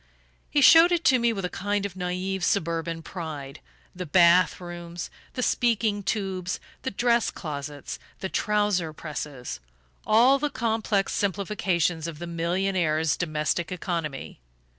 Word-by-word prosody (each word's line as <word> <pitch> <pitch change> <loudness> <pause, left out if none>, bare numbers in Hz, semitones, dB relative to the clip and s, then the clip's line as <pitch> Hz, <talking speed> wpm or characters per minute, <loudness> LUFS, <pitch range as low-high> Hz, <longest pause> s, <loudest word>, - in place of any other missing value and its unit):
He 290 - +2
showed 330 +5 +8
it 345 -1 +1
to 260 -2 +5
me 235 0 +2
with 195 -4 -3
a - - -2
kind 205 0 -1
of 195 -3 -5
naive 180 +1 -3
suburban 165 -3 -1
pride: 150 -6 -7 0.4
the 180 -1 -5
bath 175 +3 +5
rooms, 175 -1 -7 0.2
the 250 - -2
speaking 225 -4 +1
tubes, 190 -3 -2 0.2
the - - -2
dress 235 +2 +2
closets, 145 -2 -6 0.2
the 190 - -3
trouser 205 -5 0
presses 150 - -6 0.4
all 245 +6 +5
the 295 +1 0
complex 220 -5 0
simplifications 185 -4 0
of 165 -3 -6
the 175 - -6
millionaire's 170 -2 0
domestic 155 0 -1
economy. 170 -6 -4
180 Hz, 135 wpm, -26 LUFS, 165-205 Hz, 0.4 s, showed